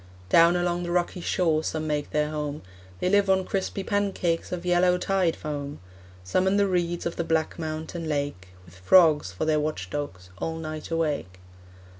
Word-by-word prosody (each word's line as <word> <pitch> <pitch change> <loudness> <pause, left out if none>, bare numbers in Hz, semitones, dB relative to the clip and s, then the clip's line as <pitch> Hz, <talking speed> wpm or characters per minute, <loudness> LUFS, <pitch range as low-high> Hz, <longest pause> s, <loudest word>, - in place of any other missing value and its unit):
Down 170 - +6
along 175 0 0
the 175 - -4
rocky 175 +1 0
shore 160 -3 +1
Some 155 0 -2
make 150 -1 -2
their 150 0 0
home, 150 -1 -4 0.4
They - - 0
live 200 +1 +3
on 190 -1 +3
crispy 195 0 -2
pancakes 195 -5 -1
Of 180 -1 -4
yellow 180 0 +3
tide 185 -3 +1
foam; 145 -1 -5 0.4
Some 185 - +1
in 195 +1 +3
the 200 - +4
reeds 175 -2 -1
Of 170 - -3
the 170 - 0
black 160 0 -1
mountain 160 +1 -4
lake, 145 -10 -2 0.2
With 85 - -17
frogs 150 - +4
for 95 - -3
their 155 -1 +2
watch 150 -12 -3
dogs 95 -12 -5
All 160 +7 -2
night 155 -1 -6
awake. 150 - -1
160 Hz, 180 wpm, -26 LUFS, 150-180 Hz, 0.4 s, Down